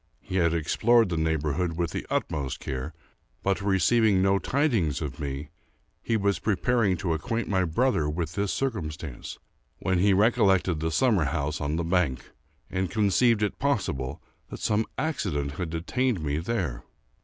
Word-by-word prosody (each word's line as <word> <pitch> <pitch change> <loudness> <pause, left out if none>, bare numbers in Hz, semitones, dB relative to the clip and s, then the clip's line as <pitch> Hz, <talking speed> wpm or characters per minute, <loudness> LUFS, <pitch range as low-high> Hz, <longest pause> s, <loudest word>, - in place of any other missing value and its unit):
He 95 - -4
had 85 -2 +3
explored 115 +7 +3
the 85 - -1
neighborhood 80 +1 0
with 85 0 -2
the - - -5
utmost 70 -4 -2
care, 65 +4 -4 0.5
but, 100 0 +1
receiving 100 +2 +3
no 95 +1 +3
tidings 120 - +1
of 70 -6 -5
me, 70 +1 -4 0.5
he 115 - 0
was 100 -1 +1
preparing 105 -1 +1
to 85 -2 -1
acquaint 115 +9 -2
my 95 -2 +1
brother 85 - +1
with 80 +1 -3
this 100 +1 -1
circumstance, 80 - -4 0.4
when 95 -1 0
he 100 +2 +4
recollected 95 -5 +3
the 80 +1 -1
summer 105 - +2
house 75 +1 -2
on 75 0 -1
the 85 - -1
bank, 85 -7 0 0.4
and 95 -1 -2
conceived 110 +1 +3
it 105 - -2
possible 80 - -1 0.3
that - - -7
some 110 +1 +1
accident 85 - -1
had 80 +3 -4
detained 105 +8 -1
me 75 0 -1
there. 85 - -2
90 Hz, 155 wpm, -27 LUFS, 80-105 Hz, 0.5 s, he